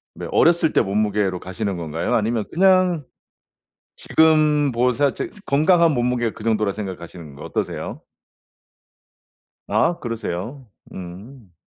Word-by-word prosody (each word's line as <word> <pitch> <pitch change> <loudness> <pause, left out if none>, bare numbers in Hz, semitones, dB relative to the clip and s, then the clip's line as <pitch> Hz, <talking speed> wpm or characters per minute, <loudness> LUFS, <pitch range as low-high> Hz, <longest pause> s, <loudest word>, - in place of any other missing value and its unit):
뭐 - - -6
어렸을 165 -2 +3
때 - - +4
몸무게로 100 -2 0
가시는 95 0 -4
건가요? 80 -1 -3
아니면 110 0 0
그냥 185 -4 +3 0.9
지금 155 -3 +3
뭐 125 +1 +2
생각할 140 +1 +1
적에 - - -4 0.2
건강한 165 +3 +4
몸무게가 120 -2 0
그 110 - -11
정도라고 105 -3 +1
생각하시는 85 -7 -8
거 - - -10
어떠세요? - - -4 1.6
아 170 - +1
그러세요? 115 +2 -5 0.2
음. 95 +3 -10
115 Hz, 290 characters per minute, -21 LUFS, 100-150 Hz, 1.6 s, 때